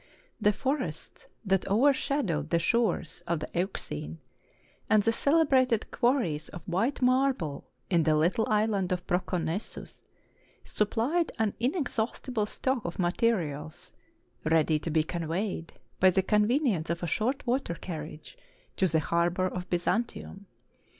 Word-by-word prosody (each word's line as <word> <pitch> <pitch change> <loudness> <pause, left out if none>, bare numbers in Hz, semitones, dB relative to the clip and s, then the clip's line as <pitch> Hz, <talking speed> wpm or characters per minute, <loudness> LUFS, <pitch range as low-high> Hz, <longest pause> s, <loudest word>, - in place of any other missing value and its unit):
The 210 - +5
forests 255 - -4 0.2
that 190 -1 +1
overshadowed 225 - +2
the 170 - +3
shores 175 -1 0
of 170 -2 0
the 155 - -6
Euxine, 80 - -3 0.7
and 215 -1 +5
the 225 - +2
celebrated 265 -6 +3
quarries 235 - +1
of 175 - -10
white 225 +10 0
marble 250 - +1 0.2
in 170 -3 +3
the 155 0 +3
little 175 +9 +2
island 210 -3 +1
of 180 -1 -1
Proconnesus, 180 +1 -3 0.6
supplied 245 +11 0
an 220 -3 +1
inexhaust 255 -3 -1
ible 215 -3 +1
stock 260 +1 -1
of 170 - -5
materials, 175 -4 -1 0.5
ready 155 -1 +3
to 165 - -4
be 160 0 +2
conveyed, 170 +2 -3 0.3
by 185 - +7
the 190 +1 +2
convenience 210 - +2
of 170 +1 -2
a - - +1
short 235 - -1
water 245 -8 0
carriage, 155 - -8 0.4
to 190 - +3
the 160 -2 +1
harbor 170 +3 +1
of 180 0 -4
Byzantium. 200 +2 -2
190 Hz, 130 wpm, -29 LUFS, 170-235 Hz, 0.7 s, by